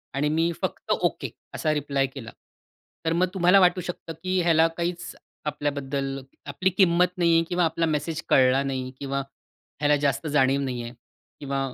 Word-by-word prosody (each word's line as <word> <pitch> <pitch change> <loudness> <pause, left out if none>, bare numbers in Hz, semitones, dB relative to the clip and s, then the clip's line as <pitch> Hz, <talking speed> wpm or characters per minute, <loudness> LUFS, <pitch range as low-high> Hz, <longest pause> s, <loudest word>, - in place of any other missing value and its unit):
आणि 145 +2 +1
मी 165 +1 +2
फक्त - - -3
ओके - - 0 0.2
असा 155 -1 0
रिप्लाय 140 -2 0
केला, 130 -4 -9 0.7
तर 165 - +2
मग 180 +2 +2
तुम्हाला 185 +1 +5
वाटू 180 0 +4
शकतं 175 -2 -6
की 185 0 +1
ह्याला 165 -1 +4
काहीच 175 0 -3 0.3
आपल्याबद्दल 140 -2 -2 0.3
आपली 145 +7 0
किंमत 180 -1 +3
नाहीये 170 -1 +4
किंवा 175 -1 +2
आपला 165 +1 0
मेसेज 155 +1 -2
कळला 130 +1 +5
नाही 130 -2 -3
किंवा 140 0 -2 0.6
ह्याला 150 0 +3
जास्त 140 +3 0
जाणीव 140 -1 +2
नाहीये 120 -3 -4 0.5
किंवा 140 -1 -3
150 Hz, 155 wpm, -25 LUFS, 135-170 Hz, 0.7 s, तुम्हाला